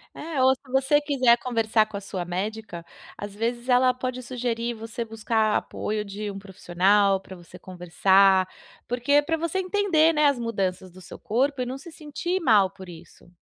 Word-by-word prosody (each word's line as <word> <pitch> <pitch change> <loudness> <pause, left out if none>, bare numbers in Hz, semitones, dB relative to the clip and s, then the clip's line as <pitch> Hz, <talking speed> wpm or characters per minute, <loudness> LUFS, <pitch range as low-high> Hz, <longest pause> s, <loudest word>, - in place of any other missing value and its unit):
É, 305 -3 -3
ou 260 0 +5
se 255 0 -19
você 270 +2 +3
quiser 255 -5 +3
conversar 225 -3 +1
com 215 -1 -8
a - - -7
sua 190 -2 -5
médica, 190 0 -5 0.3
às 205 0 -7
vezes 235 +3 -3
ela 250 0 +4
pode 255 0 -4
sugerir 240 -1 -3
você 225 +1 -6
buscar 220 -1 0
apoio 210 0 -3
de 205 +1 -6
um 195 - -8
profissional 195 +1 +1
pra 190 0 -12
você 175 +1 -14
conversar, 185 +2 +3 0.4
porque 250 +4 +2
pra 325 +2 -2
você 335 +3 -2
entender, 365 -4 +2
né, 300 -1 +2
as 280 -3 +2
mudanças 190 -5 -3
do 185 +2 -15
seu - - -11
corpo 260 +4 0
e - - -1
não 255 +2 -5
se 335 +5 -12
sentir 345 +4 -4
mal 210 - +4
por 190 -2 -12
isso. 170 0 -15
230 Hz, 185 wpm, -25 LUFS, 195-265 Hz, 0.4 s, ou